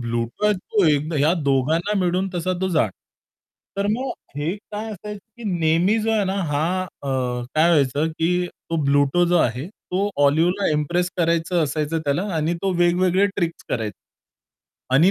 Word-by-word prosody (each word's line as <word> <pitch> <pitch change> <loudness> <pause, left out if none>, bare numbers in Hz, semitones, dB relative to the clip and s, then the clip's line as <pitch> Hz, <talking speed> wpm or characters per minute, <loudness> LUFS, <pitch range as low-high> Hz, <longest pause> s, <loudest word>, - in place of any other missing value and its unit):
Bluto 120 - 0
तो 200 +1 0
एक 150 +2 +1
या 155 +4 +4
दोघांना 155 +9 +1
मिळून 185 +1 +1
तसा 180 +1 -1
तो 190 - 0
जाड. 155 - +2 0.9
तर 200 0 0
मग 255 +4 -1 0.3
हे 150 +5 -1
काय 210 +1 -7
असायचे, 210 +1 -7 0.2
की 235 - -10
नेहमी 165 +7 +3
जो 225 - 0
आहे 215 -2 +2
ना 190 0 -1 0.2
हा, 145 +1 +1 0.2
अ, 160 -6 -9 0.5
काय 155 +2 +4
व्हायचं, 145 -1 +2
की 175 +3 0 0.2
तो 165 - 0
ब्लूटो 145 +5 +3
जो 175 - +3
आहे, 125 0 0
तो 200 -1 -3
ऑलिव्हला 170 +7 +2
इम्प्रेस 175 +4 0
करायचं 170 0 +1
असायचं 155 +2 -1
त्याला 145 +5 +1
आणि 160 +2 0
तो 195 - +1
वेगवेगळे 180 +3 +3
ट्रिक्स 170 -3 -2
कराय 110 -3 -1 1.0
आणि 165 +7 +6
170 Hz, 160 wpm, -22 LUFS, 150-190 Hz, 1.0 s, आणि